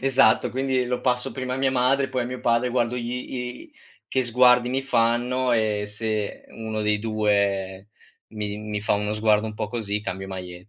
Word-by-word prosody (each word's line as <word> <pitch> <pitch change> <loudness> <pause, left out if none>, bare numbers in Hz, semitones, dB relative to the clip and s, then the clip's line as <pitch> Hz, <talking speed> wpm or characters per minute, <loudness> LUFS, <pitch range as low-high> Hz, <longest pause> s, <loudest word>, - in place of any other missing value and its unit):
esatto, 135 -4 +4
quindi 130 -1 0
lo 125 0 -2
passo 125 -1 +1
prima 130 -1 -4
a 130 - -1
mia 135 0 +2
madre, 130 +2 +2
poi 130 -2 -1
a - - -3
mio 125 +1 -5
padre, 120 +1 +2
guardo 120 0 0
gli 120 0 -3 0.3
i 125 - -6 0.4
che 130 - +1
sguardi 125 0 +4
mi 135 +1 0
fanno 125 0 +1
e 110 -2 +1
se 105 0 -3
1 110 -1 -5
dei 105 0 +1
2 100 -3 0 0.4
mi 105 -1 -4
mi 105 -1 -4
fa 105 - +1
uno 105 +1 -1
sguardo 110 0 +2
un 110 - -5
po' 105 - -4
così 105 -3 -2
cambio 95 -1 -5
maglie 90 0 -8
115 Hz, 190 wpm, -24 LUFS, 105-125 Hz, 0.4 s, esatto